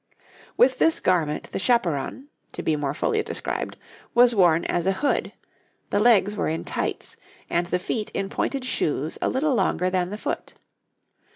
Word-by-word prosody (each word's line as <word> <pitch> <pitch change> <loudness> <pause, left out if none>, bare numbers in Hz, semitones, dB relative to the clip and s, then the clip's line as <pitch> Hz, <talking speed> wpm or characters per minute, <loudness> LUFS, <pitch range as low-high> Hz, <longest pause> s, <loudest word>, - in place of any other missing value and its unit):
With - - +4
this 325 - +4
garment 165 -5 0
the - - -3
chaperon 230 - 0 0.2
(to - - -5
be 160 - +1
more 145 -1 -2
fully 435 - +1
described) - - -4 0.4
was 240 0 +6
worn 175 -5 +4
as 175 +1 -1
a 195 - +3
hood; 280 +9 0 0.6
the 205 - +2
legs 210 -3 +4
were - - -1
in 160 +1 -2
tights, - - -3 0.3
and 175 +1 +1
the 180 - +1
feet 210 +4 -3
in 195 - -1
pointed 265 +6 -2
shoes 155 - -1
a - - +1
little 280 +2 +1
longer 185 -4 +1
than 180 -1 0
the 210 - -5
foot. - - -4
190 Hz, 170 wpm, -24 LUFS, 170-240 Hz, 0.6 s, was